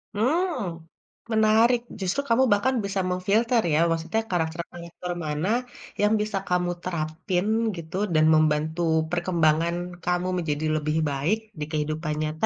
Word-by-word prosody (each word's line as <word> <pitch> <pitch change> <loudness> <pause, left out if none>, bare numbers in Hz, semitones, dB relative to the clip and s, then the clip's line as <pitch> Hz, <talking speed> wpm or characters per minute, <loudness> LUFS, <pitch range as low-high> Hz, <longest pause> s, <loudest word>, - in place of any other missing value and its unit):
Mmm, 250 - 0 0.5
menarik, 220 +3 +4 0.2
justru 190 +9 0
kamu 230 +3 +4
bahkan 260 +6 +1
bisa 195 0 -2
mem-filter 215 +6 +2
ya, - - +4
maksudnya 165 +7 0
karakter-karakter 170 +1 -4
mana 150 +3 -2 0.5
yang 210 +1 +4
bisa 210 -1 -2
kamu 180 0 +1
terapin 175 +2 -2 0.3
gitu, 170 +1 -8 0.2
dan 155 0 +4
membantu 155 +1 +2 0.3
perkembangan 170 -1 +1 0.3
kamu 180 +1 0
menjadi 155 -2 -2
lebih 155 0 0
baik, 145 +10 0 0.2
di 150 - -2
kehidupan 155 0 -2
nyata 155 +1 -1
175 Hz, 125 wpm, -25 LUFS, 155-205 Hz, 0.5 s, menarik